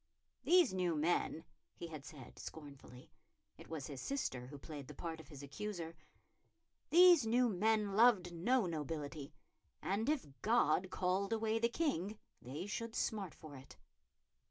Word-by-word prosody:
"These 350 - +5
new 180 -3 0
men," 160 +1 0 0.3
he - - -7
had 155 -4 -8
said 135 -6 -11
scornfully 140 -5 -10 0.4
it - - -14
was 160 -4 -4
his 140 -4 -7
sister 130 - -3
who 145 +2 -9
played 145 -1 -8
the 150 - -10
part 165 0 -5
of 160 - -12
his 145 -3 -10
accuser 165 +3 -5 0.9
"these 345 -7 +7
new 245 +2 +4
men 210 0 +1
loved 210 -6 +5
no 230 +7 +2
nobility, 150 -2 -4 0.5
and 215 +7 -1
if 305 -3 +1 0.2
God 190 -5 +3
called 185 +2 0
away 225 0 +1
the 235 +1 +2
King 220 - -1 0.2
they 145 +8 -6
should 225 +2 -4
smart 200 -6 -2
for 155 -2 -11
it." 130 0 -13
180 Hz, 150 wpm, -37 LUFS, 150-225 Hz, 0.9 s, these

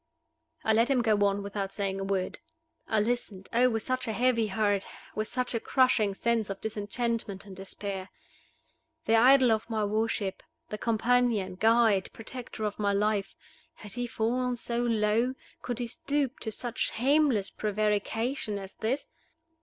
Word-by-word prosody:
I 220 - +3
let 230 +3 +3
him 255 -3 +3
go 215 -2 +3
on 200 0 -1
without 200 -1 -3
saying 195 -1 -2
a - - -2
word. 195 -1 -2 0.5
I 220 - +2
listened 210 -3 -2
oh! 250 +2 +5
with 225 -2 -1
such 255 -1 -1
a 220 - -1
heavy 235 -1 +2
heart, 205 -1 +1 0.3
with 215 0 -2
such 250 +1 -2
a 230 - 0
crushing 225 -6 +2
sense 230 -1 0
of 195 - -4
disenchantment 220 -1 -3
and 195 -2 -10
despair! 195 0 -6 1.0
The 225 - +4
idol 255 +1 +6
of 220 +1 0
my 215 -2 0
worship, 210 -2 -1 0.3
the 210 - -5
companion, 230 -3 +2
guide, 220 -1 +3
protector 230 0 -7
of 210 0 -2
my 200 -1 +2
life 205 0 0 0.4
had 210 - -11
he 245 +3 -3
fallen 245 +2 0
so 235 0 -3
low? 230 +1 +2 0.3
could 245 -2 -3
he 245 - -2
stoop 285 0 -2
to 220 - -4
such 240 +3 -3
shameless 265 -4 +2
prevarication 215 +2 -1
as 195 -1 -8
this? 255 +6 -2
220 Hz, 160 wpm, -29 LUFS, 205-245 Hz, 1.0 s, idol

